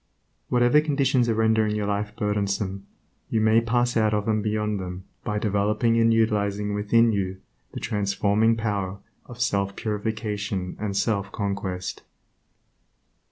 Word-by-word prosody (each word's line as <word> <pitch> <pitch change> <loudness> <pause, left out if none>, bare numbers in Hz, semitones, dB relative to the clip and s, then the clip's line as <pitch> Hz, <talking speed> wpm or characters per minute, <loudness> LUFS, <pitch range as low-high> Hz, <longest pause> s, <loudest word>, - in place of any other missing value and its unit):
Whatever 120 +4 +4
conditions 135 -5 +1
are 115 - +2
rendering 110 -1 +2
your 105 -1 -1
life 105 +1 -2
burdensome, 100 -2 -2 0.4
you 110 - +1
may 110 +1 +4
pass 120 +1 +1
out 110 -2 +3
of 105 +1 -2
and 110 -1 +1
beyond 105 -1 -1
them 90 0 -6 0.2
by 105 - -2
developing 105 +2 +1
and 115 0 +4
utilizing 105 -2 +1
within 115 +3 +3
you 95 -2 -2 0.3
the - - -5
transforming 105 +2 +1
power 100 -4 -2 0.3
of 120 -1 -11
self 100 -4 0
purification 105 -3 -3
and 100 -2 -2
self 100 -2 0
conquest. 100 -3 -3
105 Hz, 135 wpm, -25 LUFS, 100-115 Hz, 0.4 s, Whatever